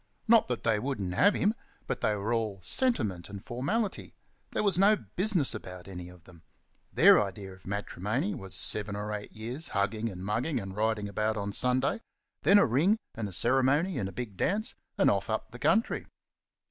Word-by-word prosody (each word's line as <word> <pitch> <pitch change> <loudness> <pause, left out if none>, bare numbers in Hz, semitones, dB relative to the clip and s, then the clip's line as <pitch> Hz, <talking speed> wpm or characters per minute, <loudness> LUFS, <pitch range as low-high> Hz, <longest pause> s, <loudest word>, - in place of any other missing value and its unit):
Not 230 0 +5
that 125 -2 -3
they 110 -2 +2
wouldn't 105 -8 -3
have 200 - +4
him; 210 +2 +2 0.3
but - - -3
they 105 - +1
were 105 +3 -2
all 110 -4 -1
sentiment 110 - +1
and 100 -1 -9
formality 190 - -2 0.3
there - - -1
was 195 -4 +2
no 205 +2 +6
business 180 - 0
about 90 -4 -8
any 90 -2 -8
of 90 -2 -16
them; 85 -3 -17 0.5
their - - +7
idea 95 -1 -7
of 95 0 -16
matrimony 105 - -2
was 95 - -6
seven 105 -1 +1
or 105 +1 -4
eight 105 -1 -6
years' 120 +9 -6
hugging 105 +3 -1
and 95 -2 -8
mugging 120 +9 -1
and 95 -1 -7
riding 110 -1 0
about 110 +2 -1
on 100 0 -3
Sunday, 130 - +2 0.4
then 200 - +6
a 200 - +6
ring 155 - +3 0.2
and 110 -2 -4
a - - -9
ceremony 135 - +2
and 95 -3 -2
a - - -9
big 110 -5 -6
dance, 215 - 0 0.2
and - - +4
off - - -1
up - - -2
the - - -10
country. 225 +1 +1
110 Hz, 190 wpm, -29 LUFS, 100-150 Hz, 0.5 s, their